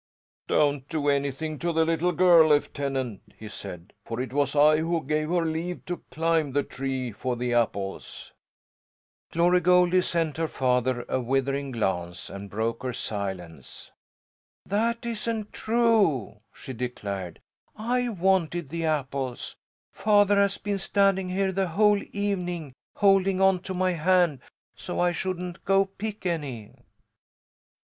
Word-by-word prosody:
"Don't 145 -2 +1
do 150 -3 0
anything 140 +2 -1
to 170 - -1
the 160 0 +2
little 165 +2 +1
girl, 175 -3 +6
Lieutenant!" 140 -6 0 0.2
he 110 - -9
said. 95 -4 -9
"For 115 +1 -5
it 130 0 -4
was 140 0 +1
I 150 +1 +6
who 165 +1 -1
gave 155 +1 0
her 175 -1 +1
leave 165 +2 -3
to 175 -2 -5
climb 160 -3 0
the 145 0 +2
tree 130 -2 -4
for 120 +4 -3
the 120 0 -2
apples." 100 -4 -2 1.0
Glory 175 +2 +3
Goldie 180 +1 +4
sent 165 -4 -1
her 165 0 0
father 125 -2 0
a 130 - -1
withering 135 +2 -1
glance, 95 -7 -3
and 100 0 -8
broke 110 +3 -2
her 130 -1 -3
silence. 95 - -6 0.7
"That 230 +4 0
isn't 225 -2 -3
true," 220 - +2
she 130 - -9
declared. 100 -7 -5 0.4
"I 245 +3 0
wanted 175 - 0
the 165 +1 -3
apples. 135 -4 -2 0.4
Father 205 -1 +3
has 200 0 +2
been 205 -1 -3
standing 195 -1 +2
here 190 +1 0
the 190 0 0
whole 205 +4 +3
evening 180 -7 -3 0.2
holding 195 -1 +3
onto 190 -1 +2
my 185 0 +1
hand 175 -3 +2 0.4
so - - -5
I 175 0 +3
shouldn't 180 0 -4
go 195 0 +3
pick 205 +1 -7
any." 140 - -3
160 Hz, 140 wpm, -26 LUFS, 130-185 Hz, 1.0 s, girl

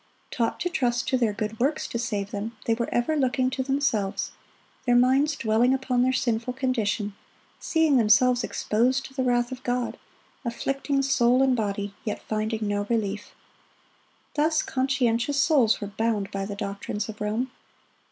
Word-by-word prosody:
Taught 230 -2 -1
to 355 - +1
trust 245 -8 0
to - - +2
their 235 -4 +2
good 215 +1 -4
works 285 +5 +1
to 235 - -4
save 205 -4 -2
them, 220 +3 -5
they 230 - +2
were 235 +1 -2
ever 240 +6 +1
looking 260 -2 +1
to 265 - -2
themselves, 260 -7 0 0.6
their 245 - +4
minds 265 +4 +4
dwelling 235 +1 +2
upon 255 -2 0
their 255 +1 +3
sinful 240 -1 -1
condition, 230 -5 -1 0.5
seeing 320 -4 +2
themselves 245 +2 +4
exposed 250 +5 0
to 265 - -11
the 265 - -2
wrath 245 -1 +1
of 260 0 -6
God, 245 -1 -2 0.4
afflicting 275 +3 -1
soul 255 -1 +3
and 260 -1 +3
body, 205 -2 -2
yet 210 - -4
finding 215 0 -2
no 205 0 -1
relief. 205 -3 -2 1.0
Thus 310 +1 +2
conscientious 260 0 0
souls 265 -10 +4
were 205 - -4
bound 220 -3 0
by 195 0 -3
the 205 0 -5
doctrines 200 0 -4
of 215 -1 -9
Rome. 220 +5 -1
240 Hz, 160 wpm, -26 LUFS, 215-265 Hz, 1.0 s, their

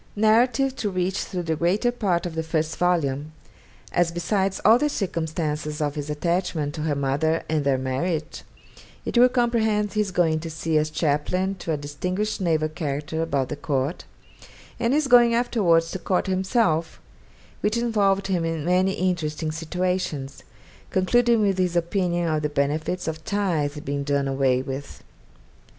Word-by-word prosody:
Narrative 240 +5 +3
to 210 - -1
reach 185 0 -1
through 180 -2 -3
the 160 -1 -1
greater 185 +9 +1
part 190 -8 0
of 175 - -4
the 160 - -1
first 160 -1 -2
volume; 155 -4 0 0.6
as 175 -1 +2
besides 190 +3 -1
all 225 +4 +7
the 295 - +1
circumstances 160 - -2
of 145 -2 -1
his 145 0 -5
attachment 160 -1 -1
to 155 - -5
her 150 -1 0
mother, 140 +4 0
and 155 -2 0
their 140 -1 +2
marriage, 150 +5 -2 0.6
it - - -4
will 245 +1 +7
comprehend 225 -4 +1
his 210 -2 0
going 165 -4 +1
to 165 +1 -6
sea 160 0 0
as 155 0 -1
chaplain 165 +5 0
to 175 -3 -5
a 155 - 0
distinguished 180 +9 -3
naval 160 -3 +1
character 155 0 -3
about 140 -5 -1
the - - -3
court; 145 +2 -2 0.7
and 240 +3 +2
his 305 0 +2
going 240 -2 +6
afterwards 175 -9 +2
to 190 - -4
court 185 +1 0
himself, 185 -4 0 0.6
which 210 +2 0
involved 205 -5 +1
him 185 -3 0
in 165 -2 -2
many 185 +2 +2
interesting 160 -4 -1
situations, 165 -4 -3 0.5
concluding 235 +4 +3
with 195 -2 +1
his 180 -1 +1
opinion 175 0 0
of 155 -1 0
the 150 - -1
benefits 155 +5 -1
of 160 0 -4
tithes 160 -8 -1
being 140 -2 -3
done 140 -1 0
away 135 -1 +1
with 135 +1 -7
170 Hz, 160 wpm, -24 LUFS, 150-195 Hz, 0.7 s, all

